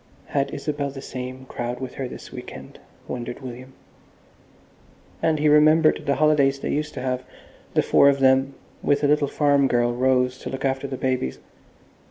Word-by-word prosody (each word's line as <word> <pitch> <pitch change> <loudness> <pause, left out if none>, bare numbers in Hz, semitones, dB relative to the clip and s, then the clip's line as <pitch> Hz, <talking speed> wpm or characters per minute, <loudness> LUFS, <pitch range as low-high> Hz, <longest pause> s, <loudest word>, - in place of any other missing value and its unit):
Had 140 -1 0
Isabel 145 0 -3
the 135 0 -8
same 130 -1 -7
crowd 120 -1 -5
with 130 -1 -6
her 135 - -4
this - - -10
week - - -8
end, - - -13 0.3
wondered 120 +1 -5
William? 130 +1 -9 1.5
And 160 -1 +2
he 150 +1 +1
remembered 155 +1 +4
the 140 - +2
holidays 145 -3 +3
they - - -3
used 150 +1 -2
to 130 - -4
have, 130 -1 -2 0.5
the - - +4
four 140 - +5
of 140 - +2
them, 135 0 +3 0.3
with 145 +1 +1
a - - +4
little 150 0 +3
farm 140 -1 +2
girl, 120 -1 +1
Rose, 125 0 +1
to - - -6
look 135 +1 -4
after 135 +1 -1
the 130 -1 -5
babies. 130 - -1
135 Hz, 180 wpm, -23 LUFS, 130-145 Hz, 1.5 s, four